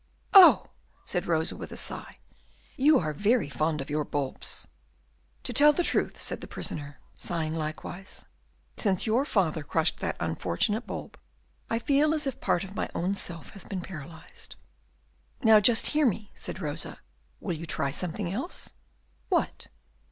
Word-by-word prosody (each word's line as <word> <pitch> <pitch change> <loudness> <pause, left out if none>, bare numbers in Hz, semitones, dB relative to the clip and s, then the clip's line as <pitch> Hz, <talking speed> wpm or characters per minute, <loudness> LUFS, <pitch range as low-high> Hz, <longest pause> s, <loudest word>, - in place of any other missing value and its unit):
"Oh!" 385 -3 +9 0.4
said 180 -2 -1
Rosa, 160 -1 +1
with - - -8
a - - -6
sigh, - - -2 0.6
"you 290 +2 +5
are 155 -3 -1
very 205 - +2
fond 155 +1 0
of 135 - -7
your 150 0 +1
bulbs." 140 -2 -4 0.8
"To - - 0
tell 295 +1 +7
the 350 - +1
truth," - - 0
said - - -2
the - - -7
prisoner, 145 -2 -4 0.2
sighing 160 -2 -2
likewise, 165 +4 -5 0.5
"since 195 -4 +1
your 235 +5 +2
father 170 - +1
crushed 160 +2 0
that - - -2
unfortunate 220 +1 0
bulb, - - -7 0.5
I 230 - +1
feel 290 +5 +3
as 305 - 0
if 270 -3 -4
part 175 - +1
of 195 0 -8
my - - -2
own 185 +3 0
self 170 -5 -4
had 200 - -7
been 190 -3 -3
paralyzed." 165 -2 -10 0.9
"Now 220 -1 +8
just 225 +2 +5
hear 300 -2 +4
me," 215 -1 -2
said - - -5
Rosa; - - -3 0.4
"will 185 - -3
you 165 +1 -6
try 140 -2 -1
something 180 +4 -3
else?" 265 - -4 0.6
"What?" - - 0
190 Hz, 160 wpm, -28 LUFS, 160-235 Hz, 0.9 s, Oh